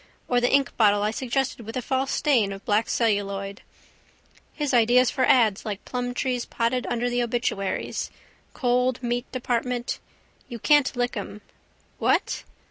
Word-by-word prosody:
Or 245 -1 +2
the 245 - +3
inkbottle 215 -7 +3
I 210 - +1
suggested 255 +1 -2
with 225 +3 -6
a - - -1
false 265 +2 0
stain 235 -9 +2
of 195 0 -8
black 210 +1 +1
celluloid. 200 -3 -1 0.9
His 295 -3 -2
ideas 245 +1 +5
for 260 - +1
ads 220 -6 +4
like 210 -2 -5
Plumtree's 245 0 -2
potted 240 +2 -1
under 240 0 -1
the 245 0 0
obituaries, 235 -5 -2 0.5
cold 250 -1 +1
meat 240 +1 -2
department. 245 -1 -2 0.5
You 240 - -5
can't 290 +2 +3
lick 245 0 -1
'em. 205 0 -6 0.6
What? - - +1
245 Hz, 140 wpm, -25 LUFS, 215-255 Hz, 0.9 s, ideas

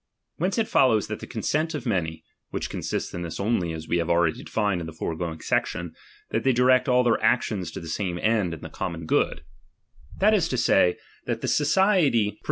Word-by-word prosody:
Whence 185 +4 -1
it 225 -1 +1
follows 115 -6 +3
that - - -4
the - - -8
consent 155 +2 -1
of 140 - -5
many, 85 -8 -1 0.3
(which - - -4
consists - - -3
in 85 - -4
this 85 -2 -5
only, 100 -5 0
as 80 0 -7
we 85 - +1
have 85 - -2
already 85 -2 +2
defined 105 -5 -1
in 80 - -5
the 80 - -8
foregoing 80 0 -4
section, 85 0 -1 0.4
that - - 0
they 130 - +3
direct 130 +2 +4
all 125 0 +4
their 120 -3 +2
actions 105 -8 +1
to - - -7
the 85 - -9
same 90 +1 -2
end 105 -4 +1
and 80 - -14
the - - -6
common 85 -1 -5
good), - - +1 0.7
that 210 +3 +4
is 185 -6 +3
to 130 - -1
say, 90 -6 +3 0.3
that - - -2
the - - -2
society 150 - +3
pro 105 - -10
VOL. - - -33
105 Hz, 215 wpm, -25 LUFS, 85-130 Hz, 0.7 s, direct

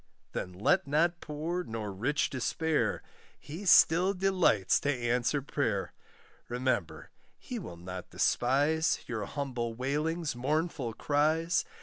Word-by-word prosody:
Then 90 - -4
let 110 - +2
not 170 +4 +2
poor 160 +4 -3
nor 110 - -5
rich 130 +10 0
despair, 155 +4 0 0.4
He 170 +7 -8
still 180 +3 +6
delights 180 - +3
to 145 - 0
answer 125 +2 0
prayer; 115 -9 -1 0.6
Remember 120 -8 -2 0.3
he - - -6
will 85 -1 -8
not 90 +1 -8
despise, 145 +6 +1
Your 110 -4 -3
humble 120 -2 -3
wailings 150 +5 -1
mournful 140 -1 -1
cries. 155 +6 +1
145 Hz, 115 wpm, -30 LUFS, 120-160 Hz, 0.6 s, still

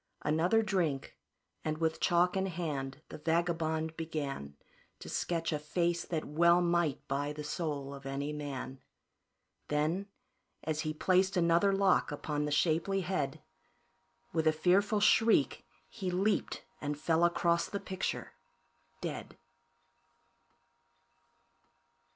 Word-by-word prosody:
Another 170 +9 +3
drink, 175 -10 -1 0.5
and 155 0 -1
with 160 0 0
chalk 175 +1 +3
in 190 0 +1
hand, 150 -5 -4
the - - -8
vagabond 160 -1 0
began 145 - -4 0.4
To - - -10
sketch 165 -1 -1
a 150 - -1
face 170 +3 0
that 160 -3 -2
well 170 +3 +4
might 170 -5 +1
buy 145 +1 -1
the 150 0 -6
soul 145 -3 -3
of 135 0 -9
any 140 +2 -3
man. 135 -3 -5 0.9
Then, 155 +7 0 0.6
as 155 -1 -2
he 155 0 -1
placed 185 +4 +2
another 170 +3 +4
lock 195 -4 +3
upon 150 0 -2
the 150 - -2
shapely 165 +5 +2
head, 175 -7 -2 0.9
With 160 -1 +1
a - - +7
fearful 195 +6 +2
shriek, 225 +2 +4 0.2
he 190 -4 -4
leaped 195 +3 0 0.2
and 145 0 -2
fell 165 +2 +2
across 170 0 +2
the 200 - -3
picture 190 -1 -4 0.7
dead. - - -5
160 Hz, 120 wpm, -32 LUFS, 150-180 Hz, 0.9 s, a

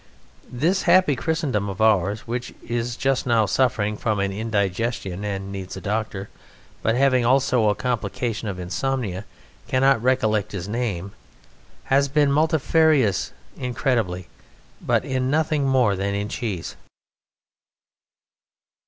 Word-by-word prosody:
This 165 +10 +1
happy 175 -5 +5
Christendom 135 -9 -1
of 95 - -6
ours 105 -1 +2
(which 120 +1 -4
is 120 0 -2
just 135 0 0
now 115 -3 +3
suffering 105 -4 +1
from 105 -1 -1
an 100 0 0
indigestion 100 -1 -2
and 100 -1 -4
needs 95 -2 -6
a - - -5
doctor 105 -1 -3 0.5
but 115 - +1
having 130 -1 +3
also 125 -3 +3
a 105 - +1
complication 115 -1 -2
of 100 -3 -4
insomnia 100 +2 -2 0.4
cannot 135 -2 +3
recollect 110 -5 +1
his 95 -2 -4
name) 100 -5 -3 0.7
has 140 +1 +2
been 145 0 +2
multifarious 155 - +2 0.2
incredibly 115 -8 -1 0.5
but - - +1
in 130 -1 -1
nothing 150 -1 +1
more 125 -6 +3
than 100 +1 -2
in 100 +1 -2
cheese! 105 - -4
115 Hz, 125 wpm, -23 LUFS, 100-135 Hz, 0.7 s, happy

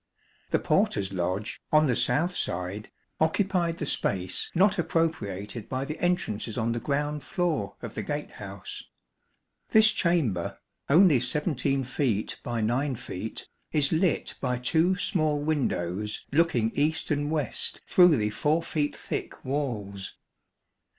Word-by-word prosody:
The - - +3
porter's 100 -1 +1
lodge, 95 +4 -2
on 155 0 +5
the 125 -4 +2
south 160 +9 +2
side, 90 +4 -3 0.3
occupied 170 +1 +1
the 150 - -3
space 95 -8 -1
not 190 +2 +4
appropriated 115 - -1
by 130 +1 -2
the 155 +2 -5
entrances 125 -11 -1
on 115 0 +1
the 120 - -1
ground 145 +3 -1
floor 155 - -1
of - - -6
the - - -3
gate - - -4
house. - - -7 0.9
This 220 0 +6
chamber, 140 - 0 0.3
only 160 -2 +6
17 140 -2 0
feet 125 -4 -1
by 120 -2 -2
9 130 +5 0
feet, 110 0 -6 0.2
is 145 -3 +3
lit 165 0 +1
by 125 -2 0
two 160 +9 +2
small 155 -4 0
windows 105 - -1
looking 135 -8 +2
east 155 +5 0
and 145 0 0
west 150 -6 -1
through 175 -5 +6
the 105 -1 0
4 155 +9 +1
feet 150 -3 -1
thick - - -5
walls. 110 -9 -3
140 Hz, 135 wpm, -27 LUFS, 110-160 Hz, 0.9 s, This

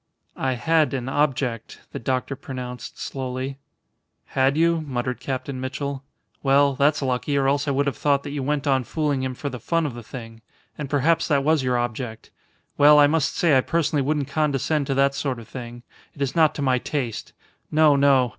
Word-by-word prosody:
"I 130 -1 0
had 155 +3 +2
an 130 -1 -4
object," 135 -4 -1
the - - -5
doctor 130 +3 -2
pronounced, 125 -3 -7
slowly. 130 +1 -4 0.7
"Had 135 +2 +2
you?" 165 0 +3
muttered 125 -4 -3
Captain 130 0 -4
Mitchell. 140 +1 -4 0.4
"Well, 140 0 +4
that's 145 +2 +2
lucky, 130 +2 0
or 135 -1 +2
else 140 +2 +1
I - - +2
would 140 +1 +1
have 140 - -2
thought 140 -1 +2
that - - -6
you 145 -1 -3
went 145 +1 -1
on 135 -2 +2
fooling 145 +2 -1
him 130 -1 -3
for 145 - -5
the 125 -2 -7
fun 165 +7 0
of 140 - -3
the 120 - -8
thing. 115 -1 -10 0.3
And 150 -3 -6
perhaps 150 +4 +2
that 140 -3 +2
was 155 0 +3
your 125 -1 +1
object. 120 -1 -4 0.5
Well, 150 +1 +8
I 145 - +8
must 150 0 +1
say 165 -5 +3
I 130 - +5
personally 160 -1 0
wouldn't 145 0 0
condescend 145 0 0
to 135 - 0
that 140 0 +3
sort 135 -2 -2
of 115 -2 -11
thing. 120 -1 -8 0.3
It 140 - -11
is 135 - -3
not 160 -3 +4
to 145 - -3
my 130 -2 +2
taste. 125 -5 -4 0.4
No, 155 -1 +5
no. 135 -3 +4
140 Hz, 200 wpm, -23 LUFS, 130-145 Hz, 0.7 s, Well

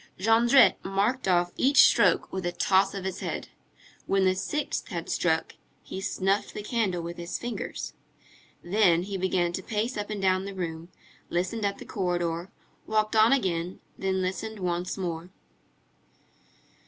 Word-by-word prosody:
Jondrette 230 +6 +5
marked 200 +6 0
off 175 -1 +2
each 275 +2 +6
stroke - - +3
with 190 -1 -3
a - - -1
toss 195 +2 +2
of 195 -1 -5
his 190 - -3
head. - - -4 0.6
When 195 -1 +2
the 185 - +4
sixth 295 +11 -3
had - - -5
struck, - - 0 0.3
he 190 - -6
snuffed 195 0 -1
the 210 - -5
candle 205 -6 -1
with 170 +1 -6
his 170 +1 -4
fingers. 240 0 -5 0.7
Then 175 -2 +3
he 200 +1 -5
began 185 -2 0
to 190 - -3
pace 220 +5 -2
up 205 0 -4
and 210 -1 -3
down 190 0 +2
the 200 -1 -6
room, 165 -2 -5 0.4
listened 195 +5 -1
at 200 - -4
the - - -10
corridor, 175 -2 -2 0.4
walked 215 0 +1
on 220 +2 +6
again, 180 -8 0 0.2
then 190 -1 -1
listened 215 +4 -3
once 180 0 -2
more. 175 -2 -4
190 Hz, 155 wpm, -27 LUFS, 175-210 Hz, 0.7 s, each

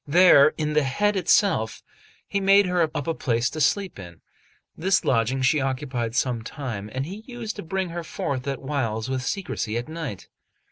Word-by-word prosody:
There, 155 -2 +6
in 150 -1 -1
the 150 - +4
head 205 +10 +1
itself, 185 - +2 0.4
he 200 - -1
made 195 +1 +5
her 180 -1 +1 0.2
up 145 - -3
a 165 - 0
place 120 -5 0
to 155 - -4
sleep 190 - +1
in; 85 -3 -11 0.5
this 190 +3 +1
lodging 125 +2 +1
she 145 +3 +3
occupied 130 -3 -2
some 125 -3 0
time, 110 -5 -6
and 130 +3 -3
he 190 +6 -7
used 240 -3 -6
to - - -4
bring 190 +2 -2
her 170 0 -5
forth 140 -4 -4
at 140 -1 -3
whiles 130 -4 -2
with 130 -1 -1
secrecy 130 - -3
at 120 - -4
night. 155 - -6
140 Hz, 185 wpm, -24 LUFS, 125-180 Hz, 0.5 s, There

